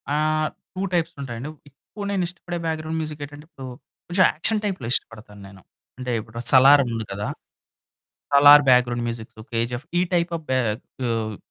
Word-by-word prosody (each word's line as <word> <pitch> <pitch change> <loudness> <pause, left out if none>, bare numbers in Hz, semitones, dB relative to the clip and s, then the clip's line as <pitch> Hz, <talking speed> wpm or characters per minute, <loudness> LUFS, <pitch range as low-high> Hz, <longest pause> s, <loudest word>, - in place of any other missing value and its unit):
ఆహ్, 155 0 +1 0.3
2 185 - -3
టైప్స్ 170 -1 0
ఉంటాయండి. 125 +2 -6 0.2
ఎక్కువ 200 +9 -11
నేనిష్టపడే 175 -2 -3
బ్యాక్ 160 -1 -1
గ్రౌండ్‌ 160 +1 -4
మ్యూజిక్ 155 -2 -5
ఏంటంటే 145 +1 -13
ఇప్పుడు 135 -6 -11 0.4
కొంచెం 185 +2 +3
యాక్షన్ 210 +7 0
టైప్‌లో 185 - -3
ఇష్టపడతానేను. 100 -4 -5 0.4
అంటే 125 -1 -4
ఇప్పుడు 110 +2 -11
'సలార్' 140 +1 +7
ఉంది 115 -1 -3
కదా! 100 +1 -4 1.1
Salaar 145 +1 +9
back 125 -1 +6
ground 120 -1 -3
musics 115 -1 -7
KGF 120 +4 -2
ఈ - - +3
టైప్ 170 0 +1
ఆఫ్ 160 - -10
బె 130 - +2 0.5
ఆహ్, 110 -3 -2
140 Hz, 155 wpm, -23 LUFS, 115-160 Hz, 1.1 s, సలార్